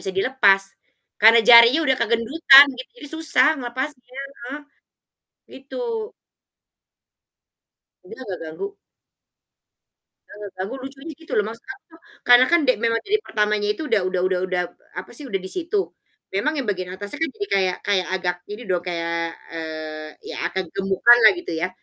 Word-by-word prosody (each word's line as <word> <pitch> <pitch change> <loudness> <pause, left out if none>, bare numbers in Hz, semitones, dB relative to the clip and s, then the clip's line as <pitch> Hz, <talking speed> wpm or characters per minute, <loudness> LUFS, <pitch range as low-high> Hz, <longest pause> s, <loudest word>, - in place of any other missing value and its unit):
bisa 190 - -4
dilepas. 195 -3 +3 0.6
Karena 225 +2 +7
jarinya 235 +6 +8
udah 265 -1 +2
kegendutan 255 +5 +6
gitu, 255 - -9
jadi 295 - -9
susah 320 -1 +2
ngelepasnya 255 +1 -6
heeh. 275 -1 -8 1.0
Gitu. 270 - -11 2.3
Mungkin 420 -2 -12
agak 195 -8 -6
ganggu. 395 - -7 1.5
Eee, 205 0 -9
ganggu 190 +7 -5
lucunya 275 +4 -9
gitu 320 - -13
loh, 210 - +2
maksud 230 +1 -10
aku 340 -4 -24 0.3
karena 245 +1 +7
kan 345 - +5
de 255 - +5
memang 230 0 +1
dari 425 +2 +1
pertamanya 210 -1 0
itu 315 - -8
udah 220 - +2
udah 185 -1 -2
udah 185 -1 0
udah, 180 -1 -1
p - - -34 0.3
apa - - -14
sih, 295 - -8
udah 195 -5 -2
disitu, 350 - -4 0.6
memang 295 +11 0
yang 260 - -3
bagian 185 -2 -5
atasnya 205 +9 -8
kan 325 - +1
jadi 405 -1 -4
kayak 185 -2 +1
kayak 195 -3 +1
agak 180 -1 -1 0.2
ini 210 +4 -7
dong, 180 -2 0
kayak, 170 -1 -3 0.2
eee, 155 -1 -7 0.2
ya - - -7
agak 190 0 -3
gemukan 195 +5 +4
lah - - +10
gitu 350 - -7
ya. 180 - -1
230 Hz, 155 wpm, -22 LUFS, 190-270 Hz, 2.3 s, lah